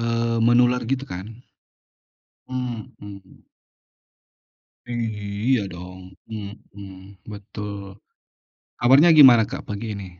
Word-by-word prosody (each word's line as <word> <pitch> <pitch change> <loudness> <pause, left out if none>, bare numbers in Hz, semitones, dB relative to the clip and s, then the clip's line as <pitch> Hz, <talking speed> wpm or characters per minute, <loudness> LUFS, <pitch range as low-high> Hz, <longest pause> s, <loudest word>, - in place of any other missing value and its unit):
eee, 115 0 -1
menular 120 +2 +3
gitu 135 +1 -1
kan. 95 -2 -8 1.2
Mhm. 110 - -8 1.4
I 120 - -6
iya 110 0 -2
dong, 90 +1 -11 0.2
mhm, 100 -2 -10 0.2
betul. 100 -1 -8 0.8
Awalnya 140 +8 +6
gimana 130 -7 +8
Kak - - -7
pagi 105 +2 -5
ini? 100 -2 -7
105 Hz, 90 wpm, -22 LUFS, 100-120 Hz, 1.4 s, gimana